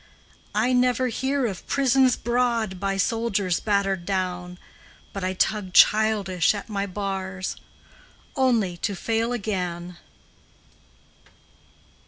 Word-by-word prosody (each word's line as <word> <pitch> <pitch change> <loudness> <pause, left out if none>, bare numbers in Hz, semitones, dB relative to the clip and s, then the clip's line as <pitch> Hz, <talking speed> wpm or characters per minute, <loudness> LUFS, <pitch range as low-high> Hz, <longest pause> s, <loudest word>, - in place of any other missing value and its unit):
I 235 +4 +2
never 250 0 +2
hear 265 +3 -1
of 195 -6 -5
prisons 265 -2 +3
broad 235 -5 0
by 195 0 -1
soldiers 200 -3 0
battered 195 -3 0
down, 180 -1 -3 0.6
But 195 - -5
I 185 0 -1
tug 190 -1 0
childish 210 -4 +4
at 205 - -6
my 200 -1 -2
bars 190 -1 -4 0.8
Only 230 -10 +1
to 200 +3 -2
fail 225 +4 -1
again! 180 -6 -3
200 Hz, 105 wpm, -24 LUFS, 185-235 Hz, 0.8 s, childish